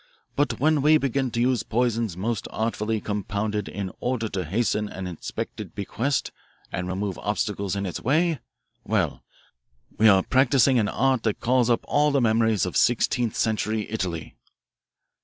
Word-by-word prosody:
But 125 -6 0
when 150 +1 +3
we 155 +2 +6
begin 135 -2 0
to 115 - -3
use 125 0 +2
poisons 115 -5 -1
most 110 +2 -2
artfully 110 0 -1
compounded 105 0 -2
in 95 -1 -4
order 120 -3 -1
to 95 -3 -3
hasten 105 +3 0
an 95 - -6
expected 90 -3 -6
bequest 125 +7 -1 0.4
and 90 0 -3
remove 95 +1 -3
obstacles 100 -1 -2
in 100 0 -2
its 90 - -4
way 155 +4 +2 0.4
well, - - -1 0.8
we 110 - +6
are 95 -2 +5
practising 130 -1 +4
an 105 - +1
art 130 -1 +1
that 110 -3 -1
calls 125 0 +2
up 120 - +3
all 150 +1 +3
the 140 -1 +2
memories 110 -3 +2
of 90 - -5
sixteenth 120 -1 +2
century 110 -1 0
Italy. 90 -7 -3
110 Hz, 155 wpm, -25 LUFS, 100-130 Hz, 0.8 s, we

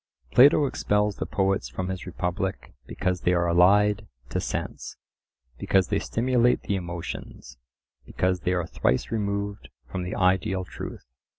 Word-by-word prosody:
Plato 145 +3 +6
expels 105 -5 0
the - - -3
poets 95 -2 0
from 95 0 -4
his 95 0 -5
Republic 90 +2 -3
because 90 -2 -2
they 90 - +2
are 85 -1 +2
allied 100 +5 +4 0.2
to - - -1
sense; - - -5 0.6
because 95 -2 +2
they 100 - +1
stimulate 125 +1 +1
the 100 - -1
emotions; 85 -8 -7 0.4
because 90 0 -1
they 90 - 0
are 90 -2 0
thrice 65 -5 0
removed 100 -2 -3 0.2
from 95 - -3
the 90 +1 -4
ideal 95 +1 +1
truth. - - -8
95 Hz, 140 wpm, -26 LUFS, 90-105 Hz, 0.6 s, Plato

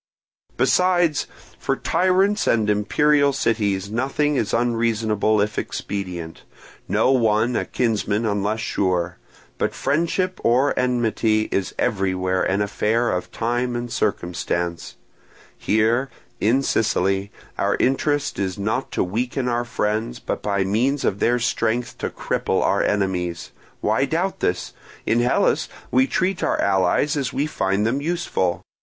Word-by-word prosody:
"Besides, 175 -4 +2 0.3
for - - 0
tyrants 185 +4 +2
and 110 -2 +3
imperial 140 +8 +3
cities 105 -6 0
nothing 135 +5 0
is 110 -5 0
unreasonable 115 -3 +1
if 105 +1 -1
expedient, 90 -5 -5 0.5
no 130 - +2
one 115 -1 +2
a - - 0
kinsman 110 -2 0
unless 105 +1 -1
sure; 90 -5 -1 0.4
but - - -1
friendship 170 +6 0
or 130 +4 +3
enmity 115 -3 +1
is 95 - -1
everywhere 95 -2 0
an 100 +2 +1
affair 110 +3 0
of 90 - -2
time 120 +1 -1
and 120 0 -4
circumstance. 85 -1 -2 0.6
Here, 115 +5 +1 0.3
in 125 +6 +2
Sicily, 100 -4 +1 0.3
our - - +1
interest 145 +2 0
is 95 -1 -2
not 110 +6 -2
to - - +1
weaken 120 +7 -2
our 120 0 0
friends, 115 +1 -2
but - - -4
by 100 -2 0
means 125 +9 0
of 100 - 0
their 120 +1 +3
strength 120 +1 -1
to - - -2
cripple - - -1
our - - +2
enemies. 90 -4 -1 0.3
Why - - +2
doubt - - -1
this? - - -1 0.3
In 115 - +2
Hellas 120 +1 +2 0.2
we 130 +1 +4
treat 185 +4 0
our - - 0
allies 95 - +2
as 135 -4 -1
we 135 +3 0
find 100 -8 0
them 130 +5 0
useful. 155 - -1
115 Hz, 135 wpm, -22 LUFS, 100-130 Hz, 0.6 s, we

